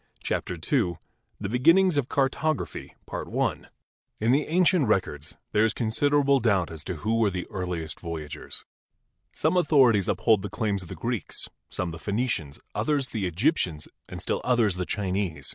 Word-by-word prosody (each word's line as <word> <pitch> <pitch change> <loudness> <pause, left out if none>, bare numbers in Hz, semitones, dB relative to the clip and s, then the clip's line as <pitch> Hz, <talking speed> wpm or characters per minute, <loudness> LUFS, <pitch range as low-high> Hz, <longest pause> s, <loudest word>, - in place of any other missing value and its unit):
CHAPTER - - -2
II 90 - 0 0.4
THE 100 - -3
BEGINNINGS 165 - +4
OF 140 -3 0
CARTOGRAPHY 140 +3 -1 1.2
In 110 +3 +2
the 145 +3 +2
ancient 175 -3 +3
records 80 -7 -1
there 105 - +3
is 110 -2 +1
considerable 140 +4 +2
doubt 100 -9 +2
as 80 -2 -6
to 95 - -3
who 110 +8 0
were 110 -3 +4
the 90 -2 -4
earliest 90 -6 -3
voyagers. 80 -4 -5 0.7
Some - - +1
authorities 130 - +4
uphold 110 -4 +3
the - - -5
claims 100 -3 -1
of 90 - -11
the - - -6
Greeks, 120 -2 -3 0.2
some 90 -2 -3
the 80 - -8
Phenicians, 100 - -2
others 145 -4 0
the 105 -5 -2
Egyptians 90 - 0 0.2
and - - -6
still - - -2
others 115 -6 +2
the 90 - -2
Chinese. 95 -7 -1
110 Hz, 155 wpm, -26 LUFS, 90-135 Hz, 1.2 s, BEGINNINGS